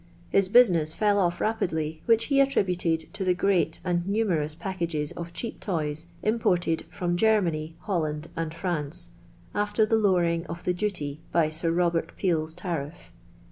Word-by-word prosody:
His 195 -1 +3
business 175 -10 +5
fell 205 -1 +2
off 175 -2 +1
rapidly, 160 -8 -1
which 230 -1 +5
he 275 -2 +2
attributed 180 - +1
to - - -3
the 180 -1 +2
great 180 -3 +1
and 175 -1 -1
numerous 180 -8 0
packages 170 -5 -3
of 170 0 -7
cheap 225 +6 -5
toys 155 -3 -2 0.2
imported 180 -7 +1
from 175 -1 -2
Germany, 175 -6 +1
Holland, 155 -5 -2
and 165 -1 -2
France, 170 -1 -3 0.4
after 205 +1 +2
the 225 +1 +2
lower 190 -5 +3
ing 170 0 -1
of 170 +1 -7
the 180 - +1
duty 175 -7 -2
by 165 -2 +3
Sir 165 +2 -2
Robert 170 0 0
Peel's 160 -4 0
tariff! 170 -4 -5
175 Hz, 155 wpm, -27 LUFS, 160-195 Hz, 0.4 s, business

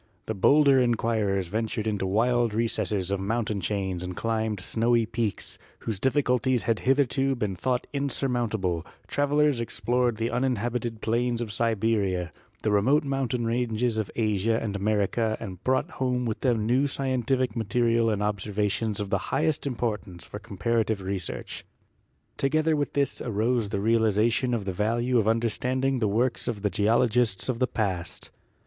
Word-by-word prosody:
The 110 - -2
bolder 140 +6 +5
inquirers 110 -5 +1
ventured 110 +2 -2
into 105 -3 -1
wild 115 +2 +2
recesses 105 -4 0
of 100 - 0
mountain 105 0 -1
chains 95 -1 -2
and 90 0 -5
climbed 110 -2 -1
snowy 115 +4 +2
peaks, 115 -3 -3 0.2
whose 110 -4 -3
difficulties 130 -1 +1
had 115 -2 +1
hitherto 135 0 +2
been 105 -6 -2
thought 125 +6 -1
insurmount 130 -5 -1
able; 90 -5 -1 0.2
travelers 145 -2 +2
explored 120 0 0
the 115 +1 -1
uninhabited 120 -2 -1
plains 120 +1 0
of 115 -3 -4
Siberia, 100 -5 0 0.3
the 110 - +1
remote 130 +10 +3
mountain 135 -4 -1
ranges 115 0 0
of 110 -3 -1
Asia 110 0 +1
and 105 -3 -3
America 110 +2 0
and 95 -5 -8
brought 130 0 +1
home 125 -1 -1
with 110 -2 -2
them 115 -5 +1
new 130 +5 +2
scientific 130 -3 0
material 115 +1 +2
and 105 -1 0
ob 105 -1 0
servations 105 +1 -1
of 100 -1 -4
the - - +2
highest 155 -2 0
importance 105 -8 -3
for 105 - -8
comparative 110 0 -1
re 95 +1 -2
search. 85 - -6 0.7
Together 155 +3 +2
with 145 -1 -2
this 140 -1 0
arose 115 0 0
the 100 - -2
realization 115 +3 +2
of 105 -4 -3
the 95 - -2
value 120 +5 +1
of 110 - 0
understanding 125 +4 +1
the 110 - +1
works 120 +5 0
of 105 -4 -3
the 105 - +1
geologists 110 0 +2
of 120 -2 -1
the 130 - +2
past. 95 -8 -3
115 Hz, 155 wpm, -26 LUFS, 105-125 Hz, 0.7 s, bolder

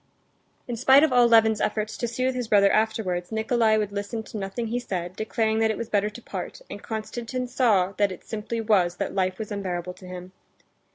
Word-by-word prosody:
In 240 - -3
spite 265 +4 +6
of 310 -5 +3
all 245 -1 +6
Levin's 220 -2 +4
efforts 215 0 -1
to 240 - -2
soothe 255 +3 -1
his 250 -2 -3
brother 200 -2 +5
afterwards, 215 -5 0
Nikolay 220 0 +2
would 210 -2 -1
listen 205 +3 -4
to 220 - -8
nothing 195 +4 -4
he 240 +2 -1
said, 180 -6 -4
declaring 220 +1 0
that 225 0 +3
it 220 - -1
was 230 -1 -5
better 210 0 +1
to 215 +3 -11
part, - - -6
and - - -7
Konstantin 235 +3 -4
saw 220 -7 +2
that 205 -2 +2
it 185 - -9
simply 225 +1 -4
was 190 -6 +2
that - - -3
life 185 -1 0
was 215 -1 -6
unbearable 180 -3 -3
to 185 - -14
him. 180 0 -8
220 Hz, 210 wpm, -25 LUFS, 195-235 Hz, -, spite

